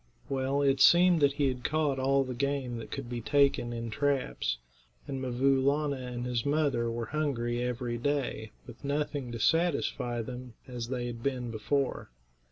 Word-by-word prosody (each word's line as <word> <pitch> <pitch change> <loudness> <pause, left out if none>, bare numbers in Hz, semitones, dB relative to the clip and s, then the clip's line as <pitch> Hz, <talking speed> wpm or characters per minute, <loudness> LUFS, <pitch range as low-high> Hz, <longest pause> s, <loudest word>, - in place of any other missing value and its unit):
Well, 135 +1 0
it 135 -1 +3
seemed 175 0 +7
that 140 -1 +4
he 140 0 +1
had 125 -2 -2
caught 150 -3 +1
all 135 +1 +3
the 130 -1 -5
game 135 -1 -1
that 115 - -7
could 135 -3 -5
be 120 -1 -4
taken 140 -2 +2
in 115 -1 -4
traps, 105 - 0 0.5
and 135 -2 -4
'Mvoo 130 +1 +2
Laana 140 -1 +1
and 120 0 -4
his 120 -2 -1
mother 140 -5 +1
were 115 0 -3
hungry 120 -4 -1
every 120 -1 -2
day, 130 -5 -1 0.2
with - - -12
nothing 140 -2 -2
to 115 - -5
satisfy 125 -6 +1
them, 125 0 -8
as 120 -2 -5
they 125 -1 -2
had 120 -1 -5
been 125 -2 -2
before. 135 - -1
130 Hz, 175 wpm, -30 LUFS, 120-140 Hz, 0.5 s, seemed